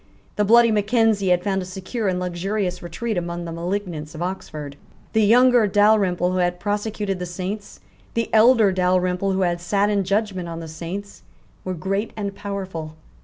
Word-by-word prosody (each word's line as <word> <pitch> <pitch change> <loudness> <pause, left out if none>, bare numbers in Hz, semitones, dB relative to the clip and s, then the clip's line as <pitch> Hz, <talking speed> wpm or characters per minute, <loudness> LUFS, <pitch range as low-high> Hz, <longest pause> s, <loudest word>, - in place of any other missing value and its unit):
The 210 - +2
bloody 230 +2 +6
Mackenzie 215 -1 +2
had 180 0 +3
found 195 -2 0
a - - -4
secure 190 +4 -4
and 180 -1 0
luxurious 180 +1 -2
retreat 175 +4 -3
among 170 0 -5
the 165 - -5
malignants 170 -3 -4
of 155 - -7
Oxford. 155 -6 -5 0.4
The 220 - +3
younger 245 +1 +5
Dalrymple 200 -3 +3
who 185 - 0
had 175 0 0
prosecuted 205 -1 -2
the 180 - -4
Saints, 195 +4 -6 0.3
the 230 -1 0
elder 220 -2 +6
Dalrymple 185 +1 +1
who 190 - 0
had 175 -1 0
sate 200 +3 +1
in 200 -1 +1
judgment 195 -2 -1
on 165 0 -5
the 165 - -7
Saints, 175 +6 -7 0.4
were 185 -1 -3
great 195 +5 -2
and 200 -2 -3
powerful. 190 -6 -6
190 Hz, 170 wpm, -22 LUFS, 175-210 Hz, 0.4 s, bloody